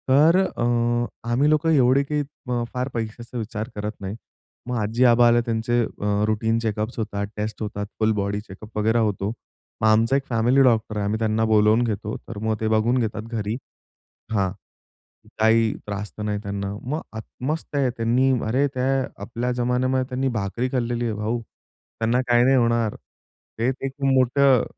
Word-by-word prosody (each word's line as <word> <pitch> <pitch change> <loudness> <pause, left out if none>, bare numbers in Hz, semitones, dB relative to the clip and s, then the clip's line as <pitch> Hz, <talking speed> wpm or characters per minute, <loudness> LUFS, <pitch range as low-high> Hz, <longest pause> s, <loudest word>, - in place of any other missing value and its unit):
तर 150 +6 +6
अ, 190 -10 0 0.7
आम्ही 135 +5 +3
लोकं 155 +1 +2
एवढे 135 -2 +4
काही 150 +1 -1 0.3
अ, 120 -1 0
फार 125 0 -1
पैशाचा 115 +2 -5
विचार 110 0 -4
करत 105 0 -3
नाही. 95 +1 -4 0.5
मग 125 - -2
आजी-आबा 120 +2 +4
आले, 120 0 +4
त्यांचे 115 +1 0
अ, 105 -1 -1
रुटीन 110 +1 +1
चेकअप्स 110 +1 -2
होतात, 100 -2 -2
टेस्ट 105 +1 -4
होतात, 105 -1 -3
फुल 110 0 +3
बॉडी 100 +1 -1
चेकअप 105 +1 -12
वगैरे 110 +2 +2
होतो. 105 -2 0 0.5
मग 110 - +4
आमचा 115 +4 +4
एक 140 - +1
फॅमिली 120 +3 +3
डॉक्टर 115 -3 +2
आहे, 100 - -1
आम्ही 105 +2 -1
त्यांना 110 0 +1
बोलावून 110 +1 +4
घेतो, 105 -2 -2
तर 115 - -7
मग 110 0 0
ते 110 - +1
बघून 110 +3 +2
घेतात 110 -2 -2
घरी. 110 -2 -3 0.8
हां, 100 -4 +1 0.9
काही 110 0 +4
त्रास 105 0 -5
तर 105 - -4
नाही 105 -1 -1
त्यांना. 100 0 -3
मग 150 +6 -3
आता 110 +3 -8
मस्त 155 +1 -3
आहे. 135 -3 +2
त्यांनी 120 +4 +2 0.2
अरे, 130 +6 +2
त्या 130 0 0 0.3
आपल्या 120 +4 -3
जमान्यामध्ये 125 +1 +1
त्यांनी 130 +1 -1
भाकरी 110 +6 -2
खाल्लेली 120 -2 -1
आहे 115 - -1
भाऊ, 110 +3 -2
त्यांना 115 +2 -4
काही 120 0 +5
नाही 135 +1 +5
होणार. 115 -2 +2 0.6
ते 120 +3 +2 0.2
एक 135 - -2
मोठं 135 -1 +4
115 Hz, 170 wpm, -23 LUFS, 110-125 Hz, 0.9 s, तर